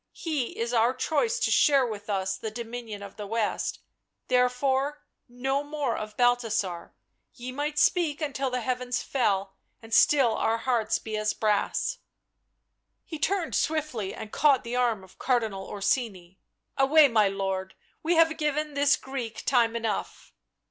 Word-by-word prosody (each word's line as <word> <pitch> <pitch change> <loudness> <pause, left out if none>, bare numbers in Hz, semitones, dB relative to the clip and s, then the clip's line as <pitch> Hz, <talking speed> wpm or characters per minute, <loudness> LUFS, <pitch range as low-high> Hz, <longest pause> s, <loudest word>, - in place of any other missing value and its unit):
He 305 -8 -3
is 235 +1 -2
our 235 +2 +3
choice 325 - 0
to 450 - 0
share 275 -3 +5
with 210 -3 -6
us 190 -1 -1
the 220 - -5
dominion 225 -2 -7
of 200 - -11
the 210 -1 -6
West, 225 0 -2 0.5
therefore 265 +3 +1 0.3
no 265 +3 -1
more 290 -4 -2
of 215 0 -6
Balthasar 230 -8 0 0.2
— - - -50
ye 250 0 -7
might 295 +3 -3
speak 315 -2 +2
until 275 -3 -2
the 250 0 -2
heavens 250 0 -2
fell 195 -7 0 0.2
and 225 0 -11
still 265 -5 +5
our 225 +1 +1
hearts 230 -2 0
be 220 -1 -6
as 215 0 0
brass 225 - 0
I" - - -38 1.0
He 320 -4 -7
turned 360 +1 0
swiftly 295 -11 -1
and 220 -1 -8
caught 285 -3 +4
the 235 0 -4
arm 235 -5 +1
of 190 - -18
Cardinal 220 -7 0
Orsini. 195 -3 -2 0.2
" - - -52
Away, 290 +3 +6
my 220 -5 +3
lord, 195 -1 -3 0.3
we 335 +2 +1
have 325 -1 +4
given 300 -1 -1
this 285 +1 +4
Greek 260 -4 -6
time 235 -3 +3
enough." 225 -3 -4
245 Hz, 160 wpm, -27 LUFS, 215-285 Hz, 1.0 s, Away